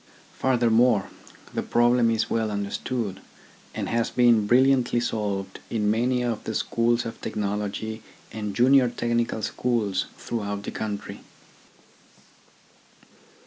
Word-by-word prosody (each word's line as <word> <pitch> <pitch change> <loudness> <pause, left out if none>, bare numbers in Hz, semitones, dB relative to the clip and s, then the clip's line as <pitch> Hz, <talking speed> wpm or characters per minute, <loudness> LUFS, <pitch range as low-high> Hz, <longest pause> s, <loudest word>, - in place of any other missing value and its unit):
Furthermore, 120 -4 +3 0.4
the - - -1
problem 120 0 +3
is 110 -1 +1
well 110 -1 0
understood, 100 +1 -3 0.6
and - - -3
has 115 0 0
been 120 -4 +4
brilliantly 125 0 +4
solved 100 -5 -3
in 105 -2 +1
many 125 +3 +1
of 120 -3 -2
the 110 - -4
schools 120 +1 +1
of 115 - -7
technology 105 +1 -3 0.3
and 105 -2 -5
junior 130 +1 +5
technical 120 -2 -1
schools 110 -4 -1
throughout 100 -3 -4
the - - -5
country. 105 -2 -5
115 Hz, 110 wpm, -25 LUFS, 105-120 Hz, 0.6 s, junior